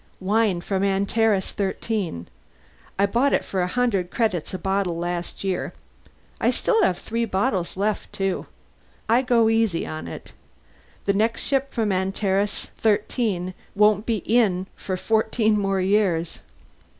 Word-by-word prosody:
"Wine 200 Hz, -2 st, +1 dB
from 190 Hz, +1 st, -1 dB
Antares 200 Hz, +1 st, +1 dB
XIII. 195 Hz, -, -2 dB, 0.7 s
I 200 Hz, -, +4 dB
bought 240 Hz, +7 st, +2 dB
it -, -, +1 dB
for 190 Hz, -, -1 dB
a 180 Hz, -, +1 dB
hundred 200 Hz, -5 st, 0 dB
credits 205 Hz, -8 st, -1 dB
a 185 Hz, -, -3 dB
bottle 190 Hz, -1 st, -1 dB
last 175 Hz, +1 st, -4 dB
year. 190 Hz, -2 st, -2 dB, 0.8 s
Still 450 Hz, -2 st, +2 dB
have 185 Hz, -, +2 dB
three 230 Hz, +1 st, -2 dB
bottles 190 Hz, -4 st, -1 dB
left, 205 Hz, +2 st, -1 dB
too. 195 Hz, -1 st, -2 dB, 0.6 s
I 235 Hz, +3 st, +4 dB
go 240 Hz, -3 st, +3 dB
easy 225 Hz, -6 st, +2 dB
on 155 Hz, 0 st, -6 dB
it; -, -, -9 dB, 0.7 s
the 200 Hz, -, +3 dB
next 220 Hz, +3 st, +1 dB
ship 275 Hz, 0 st, 0 dB
from 220 Hz, -4 st, 0 dB
Antares 195 Hz, +2 st, 0 dB
XIII 205 Hz, -4 st, 0 dB, 0.2 s
won't 210 Hz, 0 st, +3 dB
be 220 Hz, -6 st, 0 dB
in 205 Hz, -6 st, +2 dB
for 185 Hz, -1 st, -4 dB
fourteen 220 Hz, +1 st, +2 dB
more 195 Hz, -1 st, 0 dB
years." 185 Hz, -4 st, +1 dB
200 Hz, 140 wpm, -24 LUFS, 185-225 Hz, 0.8 s, I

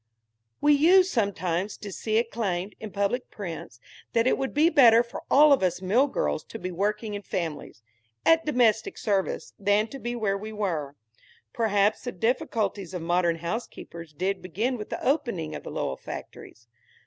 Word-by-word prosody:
We 295 Hz, 0 st, +5 dB
used 365 Hz, +6 st, +5 dB
sometimes 195 Hz, -3 st, -1 dB
to 205 Hz, -, -8 dB
see 215 Hz, +2 st, -3 dB
it 230 Hz, 0 st, 0 dB
claimed, 195 Hz, -3 st, -2 dB
in 220 Hz, -, -6 dB
public 200 Hz, +5 st, -1 dB
prints, 165 Hz, -, -7 dB, 0.3 s
that 230 Hz, 0 st, +3 dB
it 255 Hz, -, +3 dB
would 270 Hz, -1 st, -3 dB
be 300 Hz, +3 st, +4 dB
better 235 Hz, -5 st, +7 dB
for 235 Hz, -, -8 dB
all 295 Hz, +1 st, +7 dB
of 275 Hz, -, +2 dB
us 180 Hz, -1 st, +1 dB
mill 215 Hz, +10 st, +3 dB
girls 75 Hz, -, -1 dB
to -, -, -8 dB
be 185 Hz, +1 st, -5 dB
working 210 Hz, +4 st, -2 dB
in 205 Hz, -, -4 dB
families, 160 Hz, -, -5 dB, 0.4 s
at 325 Hz, 0 st, +5 dB
domestic 235 Hz, -6 st, +2 dB
service, 195 Hz, -3 st, -1 dB
than 205 Hz, +1 st, +3 dB
to 275 Hz, -, -8 dB
be 240 Hz, -1 st, -4 dB
where 200 Hz, -4 st, -1 dB
we 215 Hz, +2 st, -7 dB
were. 165 Hz, -9 st, -2 dB, 0.6 s
Perhaps 210 Hz, -1 st, +1 dB
the 245 Hz, -, -2 dB
difficulties 205 Hz, -3 st, -1 dB
of 175 Hz, -, -4 dB
modern 175 Hz, 0 st, +2 dB
housekeepers 170 Hz, -2 st, -6 dB
did 185 Hz, +5 st, -2 dB
begin 215 Hz, +9 st, -2 dB
with 210 Hz, -3 st, -7 dB
the -, -, -5 dB
opening 240 Hz, -, 0 dB
of -, -, -6 dB
the -, -, -8 dB
Lowell 65 Hz, -, -3 dB
factories. 115 Hz, 0 st, -10 dB
210 Hz, 175 wpm, -26 LUFS, 180-240 Hz, 0.6 s, better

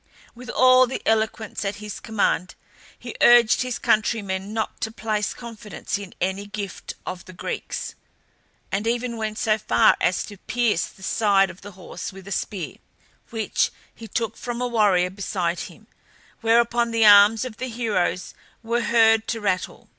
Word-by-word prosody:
With 250 Hz, +1 st, -11 dB
all 255 Hz, 0 st, +5 dB
the 260 Hz, -, -5 dB
eloquence 220 Hz, -1 st, 0 dB
at 200 Hz, 0 st, -2 dB
his 210 Hz, -1 st, -7 dB
command 205 Hz, -4 st, -1 dB, 0.4 s
he -, -, -8 dB
urged 240 Hz, -2 st, +6 dB
his 255 Hz, -2 st, -2 dB
countrymen 205 Hz, -3 st, 0 dB
not 220 Hz, +1 st, -3 dB
to 220 Hz, 0 st, -2 dB
place 215 Hz, -2 st, -2 dB
confidence 215 Hz, -4 st, -6 dB
in 200 Hz, -2 st, -10 dB
any 190 Hz, +2 st, -2 dB
gift 205 Hz, -2 st, -6 dB
of 185 Hz, -1 st, -6 dB
the 185 Hz, -, -12 dB
Greeks, -, -, -5 dB, 0.8 s
and 205 Hz, +3 st, -1 dB
even 240 Hz, 0 st, -1 dB
went 215 Hz, -1 st, -4 dB
so 215 Hz, 0 st, +1 dB
far 115 Hz, -, +4 dB
as 180 Hz, +1 st, +1 dB
to 205 Hz, -, -11 dB
pierce 230 Hz, -3 st, 0 dB
the 190 Hz, -, -16 dB
side 195 Hz, -2 st, +2 dB
of 180 Hz, -, -17 dB
the 205 Hz, 0 st, -10 dB
horse 185 Hz, 0 st, -8 dB
with 195 Hz, 0 st, -13 dB
a -, -, -8 dB
spear 190 Hz, -4 st, -4 dB, 0.5 s
which 225 Hz, -2 st, 0 dB, 0.2 s
he 225 Hz, -, -11 dB
took 225 Hz, 0 st, -3 dB
from 240 Hz, -1 st, -5 dB
a 250 Hz, -, 0 dB
warrior 200 Hz, -6 st, +2 dB
beside 185 Hz, -3 st, -2 dB
him, -, -, -17 dB, 0.5 s
whereupon 235 Hz, +1 st, +2 dB
the 230 Hz, -1 st, +3 dB
arms 205 Hz, +3 st, +7 dB
of 240 Hz, -4 st, -8 dB
the 255 Hz, -, -4 dB
heroes 215 Hz, -6 st, -1 dB, 0.3 s
were 235 Hz, +1 st, 0 dB
heard 225 Hz, -1 st, +4 dB
to 230 Hz, -, -2 dB
rattle. 190 Hz, -4 st, -2 dB
215 Hz, 165 wpm, -23 LUFS, 195-230 Hz, 0.8 s, arms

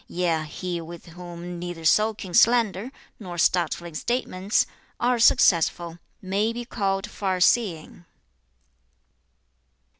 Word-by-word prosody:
Yea, 170 Hz, -3 st, -1 dB
he 175 Hz, +2 st, -5 dB
with 170 Hz, +1 st, -10 dB
whom 175 Hz, 0 st, -9 dB
neither 175 Hz, -2 st, -6 dB
soaking 210 Hz, 0 st, +2 dB
slander, 230 Hz, 0 st, +3 dB, 0.3 s
nor 180 Hz, -5 st, -8 dB
startling 170 Hz, -1 st, 0 dB
statements, 205 Hz, 0 st, 0 dB, 0.3 s
are 245 Hz, 0 st, +1 dB
successful, 170 Hz, -5 st, +3 dB, 0.2 s
may 200 Hz, +4 st, 0 dB
be 240 Hz, +1 st, -6 dB
called 195 Hz, -5 st, -1 dB
farseeing.' 185 Hz, -3 st, 0 dB
180 Hz, 95 wpm, -24 LUFS, 170-215 Hz, 0.3 s, slander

